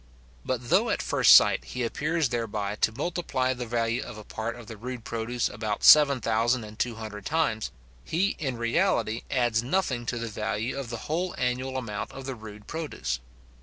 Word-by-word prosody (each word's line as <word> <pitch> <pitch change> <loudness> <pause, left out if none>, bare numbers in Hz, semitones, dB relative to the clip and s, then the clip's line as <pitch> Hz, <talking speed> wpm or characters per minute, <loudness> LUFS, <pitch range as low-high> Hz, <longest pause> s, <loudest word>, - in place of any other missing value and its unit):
But 125 -2 -3
though, - - +4
at - - 0
first - - +4
sight, - - +6
he 125 - -4
appears 155 +5 0
thereby 105 -4 -2
to 110 - +2
multiply 135 -2 -1
the 125 -1 -5
value 115 0 0
of 120 -3 -8
a 110 - -9
part 110 +3 -4
of 120 -1 -11
the 110 - -8
rude 120 +2 -6
produce 115 +2 -1
about 105 -1 -4
seven 145 -3 +8
thousand 115 +2 +1
and 105 +1 -11
two 120 -2 0
hundred 110 -2 -7
times, 150 -9 0 0.3
he 185 +5 +1
in 130 -5 -2
reality 115 - +1
adds 120 -3 +2
nothing 130 -4 -1
to 120 - -1
the 115 0 -3
value 110 +2 -2
of 135 -4 -5
the 120 -2 -6
whole 175 +4 -1
annual 130 +1 -1
amount 115 -5 -4
of 135 - -8
the 135 - -3
rude 105 -3 -11
produce. 110 - -3
120 Hz, 190 wpm, -27 LUFS, 110-130 Hz, 0.3 s, seven